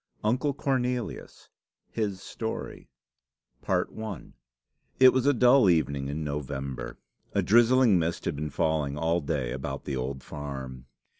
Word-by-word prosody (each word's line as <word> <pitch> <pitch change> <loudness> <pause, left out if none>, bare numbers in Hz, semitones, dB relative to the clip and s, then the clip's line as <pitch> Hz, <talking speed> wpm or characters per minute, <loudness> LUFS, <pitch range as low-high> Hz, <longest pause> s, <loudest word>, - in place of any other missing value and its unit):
UNCLE 130 +6 +1
CORNELIUS 125 -4 -2 0.4
HIS 100 -4 -2
STORY 110 -1 -6 2.1
It 130 -1 +8
was 130 +1 +1
a 145 - +5
dull 125 -2 +6
evening 70 -5 +1
in 75 +3 -3
November. 70 -2 -4 0.4
A - - +2
drizzling 120 -2 +5
mist 85 +1 -2
had - - -1
been 75 +2 -3
falling 75 0 0
all 80 +2 +1
day 70 -5 -2
about - - -5
the 70 - -3
old 65 +1 -4
farm. 65 -3 -7
80 Hz, 125 wpm, -28 LUFS, -, 2.1 s, It